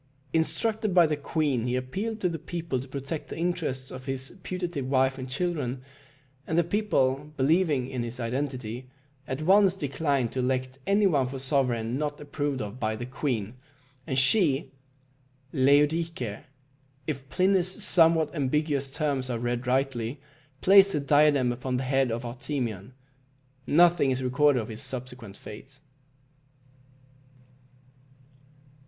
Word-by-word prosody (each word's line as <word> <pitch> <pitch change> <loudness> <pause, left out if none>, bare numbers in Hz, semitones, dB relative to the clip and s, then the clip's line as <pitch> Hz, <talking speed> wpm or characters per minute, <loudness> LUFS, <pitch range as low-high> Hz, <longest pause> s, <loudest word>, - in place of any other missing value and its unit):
Instructed 195 +6 0
by 175 -2 +7
the 155 -1 0
queen, 145 -5 -1
he 125 - 0
appealed 195 - -3
to 180 - +2
the 165 -2 -3
people 165 -4 -3
to 130 - -8
protect 140 +4 -5
the - - -6
interests 160 -7 -2
of 130 0 -8
his 135 -1 -3
putative 175 -8 -4
wife 130 0 +2
and 130 0 -6
children; 135 -4 -2 0.6
and 160 - -1
the 170 - +5
people, 150 -8 0
believing 145 -2 +2
in 130 -2 -4
his 120 +1 -5
identity, 125 -1 -4 0.4
at 130 +4 -3
once 195 +2 +5
declined 140 -6 -1
to 130 - -4
elect 130 +1 -1
any 200 +1 +3
one 145 -9 +3
for 135 +1 -6
sovereign 130 -3 0
not 145 -1 -3
approved 145 -2 -3
of 105 +4 -8
by 110 -2 -1
the 120 +2 -5
queen, 125 -5 -3 0.5
and 130 - -1
she 135 -2 +3 0.8
(Laodice), 150 +5 +3 0.9
if 135 -3 -5
Pliny's 185 -1 +1
somewhat 165 -3 +4
ambiguous 145 -1 0
terms 135 -3 -1
are 120 - -1
read 120 +1 -2
rightly, 130 -1 0 0.4
placed 195 +1 +7
the 150 - +1
diadem 145 -3 +4
upon 125 +1 -3
the 130 - -2
head 135 0 +1
of 120 +2 -3
Artemion. 120 -4 -4 0.7
Nothing 170 -3 +5
is 130 0 -1
recorded 130 +2 +3
of 110 - -9
his 110 0 -6
subsequent 125 -5 -6
fate. 135 +6 -11
135 Hz, 140 wpm, -27 LUFS, 130-160 Hz, 0.9 s, by